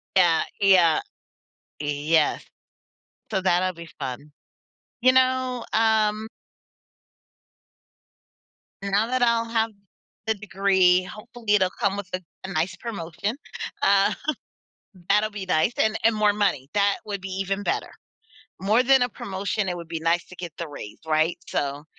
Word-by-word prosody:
Yeah, 175 Hz, -3 st, +5 dB, 0.2 s
yeah. 180 Hz, -5 st, +5 dB, 0.8 s
Yes. 150 Hz, +2 st, +1 dB, 0.9 s
So 190 Hz, -, +1 dB
that'll 185 Hz, 0 st, +2 dB
be 170 Hz, 0 st, -10 dB
fun. 135 Hz, +2 st, -6 dB, 0.7 s
You 255 Hz, +1 st, +6 dB
know, 255 Hz, -2 st, +2 dB
um 220 Hz, -1 st, +2 dB, 2.6 s
now 200 Hz, +3 st, +1 dB
that 255 Hz, 0 st, -1 dB
I'll 235 Hz, -1 st, +3 dB
have 225 Hz, -1 st, +1 dB, 0.5 s
the 220 Hz, -, +2 dB
degree, 190 Hz, -3 st, +3 dB
hopefully 215 Hz, +2 st, -2 dB
it'll 185 Hz, -2 st, +3 dB
come 200 Hz, 0 st, +1 dB
with 195 Hz, -2 st, -6 dB
a 185 Hz, -, -2 dB, 0.2 s
a 190 Hz, -, -6 dB
nice 175 Hz, 0 st, -1 dB
promotion, 200 Hz, 0 st, -4 dB, 0.5 s
um, 195 Hz, 0 st, +4 dB, 1.0 s
that'll 210 Hz, +2 st, +3 dB
be 200 Hz, -2 st, -6 dB
nice 170 Hz, +6 st, +2 dB
and 220 Hz, 0 st, +2 dB
and 225 Hz, -1 st, +5 dB
more 210 Hz, -1 st, +3 dB
money, 145 Hz, -10 st, 0 dB
that 200 Hz, -1 st, +2 dB
would 200 Hz, -2 st, -4 dB
be 195 Hz, -, -6 dB
even 195 Hz, +1 st, -2 dB
better. -, -, -2 dB, 0.7 s
More 215 Hz, +6 st, +3 dB
than 265 Hz, 0 st, +5 dB
a 245 Hz, -, +3 dB
promotion, 195 Hz, 0 st, -3 dB
it 175 Hz, -, -3 dB
would 170 Hz, -1 st, -8 dB
be 165 Hz, -1 st, -4 dB
nice 170 Hz, +1 st, +1 dB
to 180 Hz, -, -13 dB
get 175 Hz, -3 st, -7 dB
the 170 Hz, -, -4 dB
raise, 125 Hz, -8 st, -9 dB
right, 155 Hz, +2 st, +1 dB
so, 145 Hz, +1 st, -2 dB
195 Hz, 140 wpm, -24 LUFS, 170-215 Hz, 2.6 s, You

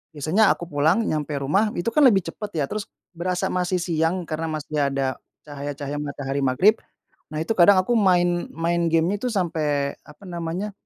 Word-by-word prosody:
Biasanya 160 Hz, +9 st, +2 dB
aku 170 Hz, -1 st, -9 dB
pulang, 160 Hz, +10 st, +2 dB
nyampe 150 Hz, -5 st, -2 dB
rumah, 150 Hz, +11 st, +1 dB
itu 185 Hz, +7 st, -1 dB
kan 265 Hz, -, +2 dB
lebih 195 Hz, -6 st, +3 dB
cepat 205 Hz, 0 st, -8 dB
ya, 155 Hz, -, +1 dB
terus 215 Hz, -1 st, -4 dB, 0.2 s
berasa 180 Hz, +1 st, -2 dB
masih 180 Hz, 0 st, 0 dB
siang, 170 Hz, +1 st, 0 dB
karena 160 Hz, 0 st, -4 dB
masih 155 Hz, -1 st, -3 dB
ada 135 Hz, -1 st, -2 dB, 0.2 s
cahaya-cahaya 145 Hz, 0 st, -5 dB
matahari 140 Hz, -1 st, -4 dB
maghrib. 140 Hz, -, +3 dB, 0.5 s
Nah 155 Hz, 0 st, -3 dB
itu 165 Hz, -, -4 dB
kadang 200 Hz, -1 st, +6 dB
aku 235 Hz, +4 st, +1 dB
main 175 Hz, -3 st, +2 dB
main 170 Hz, +1 st, 0 dB
gamenya 165 Hz, +5 st, +2 dB
itu 250 Hz, -, -2 dB
sampai 150 Hz, -7 st, -1 dB
apa 150 Hz, +6 st, -16 dB
namanya, 175 Hz, +2 st, -4 dB
165 Hz, 170 wpm, -23 LUFS, 145-185 Hz, 0.5 s, kadang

